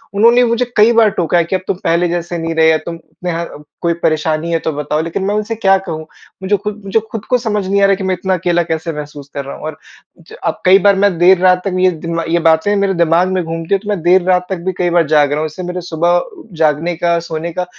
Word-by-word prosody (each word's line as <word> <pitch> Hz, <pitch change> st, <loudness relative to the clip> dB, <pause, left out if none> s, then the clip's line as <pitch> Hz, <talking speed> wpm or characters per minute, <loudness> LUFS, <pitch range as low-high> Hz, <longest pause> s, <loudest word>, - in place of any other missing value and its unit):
उन्होंने 235 Hz, +4 st, +5 dB
मुझे 235 Hz, +1 st, 0 dB
कई 215 Hz, +2 st, +6 dB
बार 220 Hz, -, +5 dB
टोका 175 Hz, 0 st, +1 dB
है 170 Hz, -, +3 dB
कि 180 Hz, +3 st, -2 dB
अब -, -, -2 dB
तुम -, -, -1 dB
पहले 170 Hz, +2 st, +2 dB
जैसे 175 Hz, 0 st, -3 dB
नहीं 165 Hz, 0 st, -3 dB
रहे 160 Hz, 0 st, +4 dB
या 160 Hz, -, +4 dB
तुम 165 Hz, -1 st, -6 dB, 0.2 s
में 180 Hz, -, -1 dB
है 170 Hz, +1 st, -3 dB, 0.4 s
कोई 170 Hz, 0 st, +1 dB
परेशानी 155 Hz, +1 st, 0 dB
है 165 Hz, -, +1 dB
तो 160 Hz, -, -2 dB
बताओ 150 Hz, +1 st, -2 dB
लेकिन 165 Hz, +4 st, -4 dB
मैं 200 Hz, +2 st, -1 dB
उनसे 215 Hz, +2 st, -2 dB
क्या 195 Hz, -3 st, +3 dB
कहूँ? 160 Hz, -5 st, -6 dB, 0.4 s
मुझे 200 Hz, +2 st, +1 dB
खुद 210 Hz, +1 st, -6 dB
मुझे 195 Hz, +3 st, +1 dB
खुद 220 Hz, -2 st, -6 dB
को 250 Hz, -, +3 dB
समझ 210 Hz, -4 st, -2 dB
नहीं 200 Hz, +1 st, +1 dB
आ -, -, +6 dB
रहा 195 Hz, 0 st, +3 dB
कि 190 Hz, -, -6 dB
मैं 190 Hz, 0 st, 0 dB
इतना 190 Hz, +1 st, -2 dB
अकेला 175 Hz, -1 st, +1 dB
कैसे 160 Hz, 0 st, -3 dB
महसूस 145 Hz, -1 st, -8 dB
कर 140 Hz, -1 st, -5 dB
रहा 140 Hz, -, -7 dB
हूँ -, -, -12 dB
और 155 Hz, -2 st, -6 dB, 0.4 s
ज 165 Hz, -, -14 dB
अब -, -, -2 dB
कई 190 Hz, +2 st, +7 dB
बार 200 Hz, +1 st, +4 dB
मैं 195 Hz, -2 st, +1 dB
देर 185 Hz, +1 st, +6 dB
रात 180 Hz, 0 st, +3 dB
तक 190 Hz, -2 st, -2 dB
ये 185 Hz, 0 st, +4 dB
दिन 165 Hz, 0 st, -5 dB
वा 165 Hz, -, -1 dB
ये 170 Hz, +1 st, +2 dB
बातें 160 Hz, +6 st, +3 dB
मेरे 200 Hz, -1 st, +1 dB
दिमाग 170 Hz, +1 st, +2 dB
में 185 Hz, -2 st, 0 dB
घूमती 165 Hz, +2 st, -4 dB
है 195 Hz, -, +3 dB
तो 205 Hz, +2 st, -9 dB
मैं 205 Hz, -4 st, -1 dB
देर 180 Hz, +2 st, +4 dB
रात 180 Hz, -1 st, +2 dB
तक 190 Hz, -, -2 dB
भी 190 Hz, -, -1 dB
कई 175 Hz, -1 st, +1 dB
बार 170 Hz, -2 st, +2 dB
जाग 145 Hz, -1 st, +3 dB
रहा 150 Hz, -, 0 dB
हूँ 155 Hz, -, -1 dB
इससे 155 Hz, +4 st, -8 dB
मेरे 180 Hz, 0 st, -4 dB
सुबह 175 Hz, +1 st, +1 dB, 0.4 s
जागने 160 Hz, +2 st, +1 dB
का, 170 Hz, 0 st, +1 dB
सोने 165 Hz, 0 st, -5 dB
का 180 Hz, +2 st, -2 dB
175 Hz, 275 wpm, -15 LUFS, 165-195 Hz, 0.4 s, कई